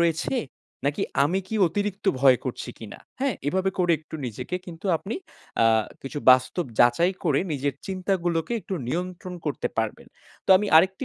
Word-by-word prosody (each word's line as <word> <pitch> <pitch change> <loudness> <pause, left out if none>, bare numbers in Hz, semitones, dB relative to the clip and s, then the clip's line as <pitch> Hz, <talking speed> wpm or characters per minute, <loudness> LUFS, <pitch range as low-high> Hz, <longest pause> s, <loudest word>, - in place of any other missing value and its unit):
রয়েছে? 170 +9 +1 0.5
নাকি 145 - 0 0.2
আমি 180 +6 +1
কি 220 - -4
অতিরিক্ত 205 +3 -3 0.2
ভয় 130 -2 +6
করছি 130 - -4
কিনা? 110 - -9 0.2
হ্যাঁ, 275 -1 +1
এভাবে 190 +3 +1
করে 175 -2 +3
একটু 155 - -13
নিজেকে 125 - -4
কিন্তু 170 +3 -8
আপনি 195 +7 -5 0.5
আ - - +5 0.4
কিছু 135 +2 -5
বাস্তব 130 +7 +4
যাচাই 120 +10 +5
করে 145 -4 +3
নিজের 140 -1 -1
চিন্তাগুলোকে 180 -2 -1
একটু 190 - -5
নিয়ন্ত্রণ 180 +4 -4
করতে 150 - -1
পারবেন। 110 -1 -2 0.4
তো - - +1
আমি 210 +2 0
আরেকটি 190 +10 +4
170 Hz, 160 wpm, -25 LUFS, 140-190 Hz, 0.5 s, ভয়